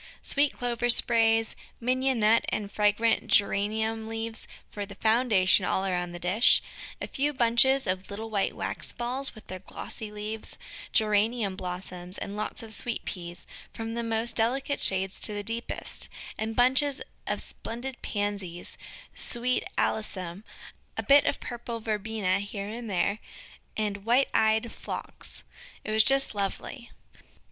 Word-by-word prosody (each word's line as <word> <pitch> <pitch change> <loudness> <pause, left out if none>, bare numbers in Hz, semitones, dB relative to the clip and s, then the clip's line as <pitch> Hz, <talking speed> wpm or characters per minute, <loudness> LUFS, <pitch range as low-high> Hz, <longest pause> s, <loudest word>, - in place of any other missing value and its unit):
Sweet 285 0 +3
Clover 240 -1 0
sprays, 225 -1 +4 0.2
Mignonnette 245 -3 +3
and 205 -1 -2
fragrant 215 +2 +2
Geranium 220 +2 +2
leaves 225 0 -4 0.2
for 205 - -5
the 200 0 -8
foundation 220 -4 +4
all 190 +1 +1
around 180 -2 -1
the 175 - -6
dish, 185 +7 +5 0.4
a - - -3
few 290 +2 0
bunches 260 +2 +4
of 185 0 -1
the - - -11
little 220 +2 -6
white 200 -2 0
wax - - -4
balls, 255 +3 0
with 215 - -12
their 185 0 -6
glossy 210 +3 -6
leaves, 210 +1 -5 0.3
Geranium 215 -1 +2
blossoms, 180 0 -5
and 200 - -5
lots 215 +2 -2
of 220 -1 -5
Sweet 240 +1 -1
Peas, 175 -2 -5 0.3
from 225 0 -4
the 235 - -1
most 230 0 0
delicate 265 +5 +1
shades 190 0 0
to 210 - 0
the 205 - -3
deepest, 230 +3 -2 0.3
and 220 +1 -3
bunches 265 +3 +4 0.3
of - - 0
splendid 245 +3 -6
Pansies, 200 -4 -3 0.3
Sweet 250 +1 0
Alyssum, 190 -3 -1 0.5
a - - -1
bit 280 +1 +7
of - - +1
purple 235 -1 -5
Verbena 215 -3 0
here 200 0 -5
and 230 +1 -6
there, 200 +3 +1 0.6
and 205 -2 -1
white 245 +5 +4
eyed 220 +1 +3
Phlox. - - -5 0.4
It - - -4
was 220 0 +6
just 270 0 +4
lovely. 210 +4 -3
220 Hz, 145 wpm, -28 LUFS, 200-235 Hz, 0.6 s, bit